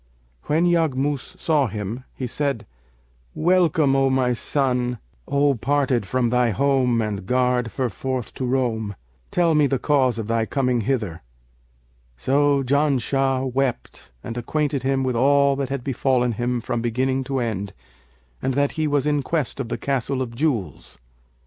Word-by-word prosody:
When 160 +4 +2
Yaghmus 150 -1 0
saw 150 -6 +2
him, 110 +4 -5
he 130 - -4
said, 140 -1 -2 0.7
'Welcome, 165 -5 +3
O 135 0 +3
my 130 -2 +2
son, 125 -1 0 0.3
O 140 0 +3
parted 130 -3 0
from 125 +2 0
thy 125 -1 +3
home 125 -1 +2
and 100 -3 -4
garred 125 -1 +2
ferforth 125 0 -3
to 130 - -4
roam! 115 -5 -1 0.3
Tell 170 -2 +2
me 150 -2 +4
the 135 - 0
cause 130 -4 +2
of 110 - -3
thy 115 0 0
coming 125 -4 +1
hither.' 105 -9 -2 1.0
So 140 - +2
Janshah 135 -1 +1
wept 135 -2 -2
and 115 - -6
acquainted 140 +3 -1
him 135 +1 0
with 130 -2 -1
all 140 +3 +4
that 135 -2 -2
had 135 -2 -3
befallen 125 -2 +1
him 120 +2 -1
from 115 0 -2
beginning 130 +3 0
to 135 0 -2
end 100 -5 -2 0.7
and 130 - -1
that 140 0 +2
he 155 -1 -1
was 145 -2 +1
in 145 -1 +1
quest 145 -1 -2
of 125 -4 -3
the - - -2
Castle 135 -1 -1
of 120 -2 -7
Jewels. 115 - -2
130 Hz, 155 wpm, -23 LUFS, 120-140 Hz, 1.0 s, me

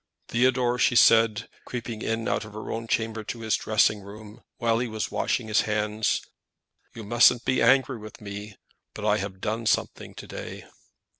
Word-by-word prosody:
"Theodore," 125 0 +2
she 120 - +3
said, 115 -2 +5 0.2
creeping 115 -2 -6
in 115 0 -2
out - - 0
of 105 -1 -11
her 110 - -6
own 115 0 -4
chamber 110 -1 -1
to 115 - -6
his 110 -1 +1
dressing 110 -1 +2
room, 105 +2 -12 0.2
while 115 -2 +1
he 125 - -1
was 110 -1 -4
washing 120 - -1
his 110 0 +3
hands, 105 0 -1 0.7
"you 115 - -7
mustn't 120 +3 +4
be 130 0 +1
angry 130 0 +3
with 110 0 -11
me, 100 0 -8 0.4
but - - -5
I - - +3
have 95 0 -5
done 110 +1 -2
something - - -1
to - - -9
day." - - -8
110 Hz, 175 wpm, -26 LUFS, 105-120 Hz, 0.7 s, said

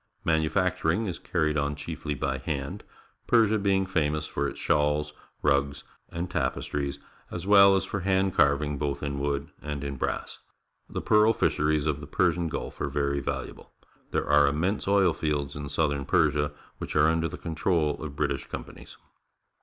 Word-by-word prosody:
Manufacturing 85 +4 +1
is 90 -4 -4
carried 75 -3 0
on 70 +1 -1
cliiefly 75 -1 -5
by 65 -1 -1
hand, 70 0 -4 0.4
Persia 110 -2 +4
being 95 -1 +2
famous 75 -4 0
for 70 -1 -2
its - - -7
shawls, 75 0 +1 0.3
rugs, 70 -1 +1 0.3
and 85 +2 -4
tapestries, 70 -4 -2 0.3
as 85 0 -6
well 100 -1 +7
as 95 - 0
for 100 - -3
hand 95 0 +1
car\nng 70 -1 +2
both 70 -1 -2
in 70 -1 -2
wood 70 0 -2
and 75 -1 -5
in 70 -1 -4
brass. - - -3 0.5
The - - -4
pearl 105 +1 +5
fisheries 75 -5 +1
of 75 -2 0
the 75 - -9
Persian 85 -1 +1
Gulf - - -5
are - - 0
very 70 -1 0
valuable. - - -5 0.4
There - - -1
are 75 -1 +5
immense 85 +10 0
oil 100 -4 +4
fields 75 -3 -2
in 70 0 -5
southern 70 -1 0
Persia, 75 +2 +2 0.3
which - - -5
are 75 - +5
under 80 0 +1
the 85 +3 -7
con 85 - -5
trol 80 -3 +1
of 75 -3 -6
British 70 -2 -1
companies. - - -9
75 Hz, 170 wpm, -27 LUFS, 70-90 Hz, 0.5 s, well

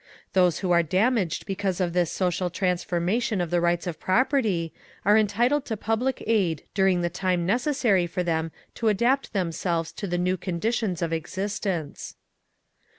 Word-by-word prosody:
Those 180 -3 +3
who 185 - 0
are 170 -1 +5
damaged 190 - +1
because 195 -1 -2
of 175 -2 0
this 175 -2 +1
social 180 -1 0
transformation 180 +4 0
of 175 -2 -2
the 175 -1 +2
rights 175 0 +1
of 175 -3 -4
property 205 - +1 0.3
are 205 +1 +6
entitled 235 +7 +2
to 220 - -3
public 225 +6 -1
aid 190 -9 +1
during 190 -2 +3
the 175 - 0
time 180 -2 0
necessary 235 - +2
for 180 +2 -2
them 165 -1 -1 0.2
to 230 - -2
adapt 240 +6 +2
themselves 170 -3 -1
to 200 - -6
the 175 -1 -1
new 180 +1 +1
conditions 185 +1 -1
of 165 -1 -1
existence. 180 -1 -3
185 Hz, 155 wpm, -25 LUFS, 175-215 Hz, 0.3 s, are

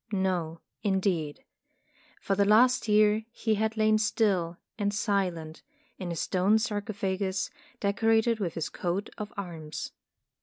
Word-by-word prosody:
No, 180 -5 -1 0.2
indeed. 185 -7 0 0.8
For 195 - -1
the 200 +1 +3
last 235 +5 +4
year 210 +1 +4
he 225 -1 0
had 220 +1 0
lain 215 0 +4
still 195 -6 +1 0.2
and 205 0 +1
silent 185 -6 -1 0.4
in 180 -3 -4
a - - -3
stone 185 +5 +2
sarcophagus 200 -3 -2 0.3
decorated 225 +3 +2
with 175 -5 -2
his 165 - -2
coat 180 +3 -3
of 210 0 -5
arms. 165 -6 -6
200 Hz, 125 wpm, -28 LUFS, 180-215 Hz, 0.8 s, last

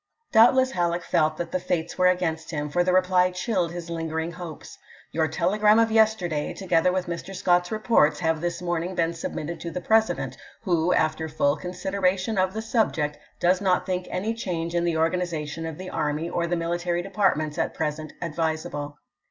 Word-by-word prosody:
Doubtless 260 +4 +6
Halleck 175 -2 0
felt 155 -1 +1
that 170 -1 -4
the 185 - 0
Fates 175 -2 -2
were 185 0 +4
^p.'eL"" 180 - +6
against 160 -2 -3
him, 150 -2 -3
for 175 +2 +2
the 180 - +1
reply 185 0 +4
chilled 180 -2 -1
his 175 -1 -6
lingering 165 0 -3
hopes: 165 -2 -9 0.2
" - - -25
Your 160 -1 +1
telegram 210 +7 +3
of 225 0 +3
yesterday, 215 -9 +2
together 180 -2 +2
with 185 0 -1
Mr. 175 +3 -6
Scott's 175 -1 +2
reports, 215 -8 +3
have 160 -2 +1
this 175 +1 -3
morning 175 +1 -2
been 165 -1 +1
sub 165 - -5
mitted 165 +3 -4
to 170 - -5
the 170 - -4
President, 220 +4 +1 0.3
who, 175 -3 +1
after 160 -1 +1
full 145 -1 +1
considera 185 +2 -1
tion 190 +2 -2
of 185 0 +1
the 220 - -3
subject, 165 -10 0 0.2
does 180 +2 +3
not 185 -2 +2
think 185 -1 -2
any 215 +5 -1
change 170 -7 -3
in 170 0 +1
the 170 -2 +1
organization 165 -2 -1
of 160 -2 -6
the 185 0 -7
army 150 +2 -1
or 170 0 -1
the 175 - 0
military 175 +1 -1
de 195 - -8
partments 165 -6 +1
at - - -1
present 155 0 -3
advisable. 155 -3 -3
175 Hz, 195 wpm, -25 LUFS, 160-185 Hz, 0.3 s, Doubtless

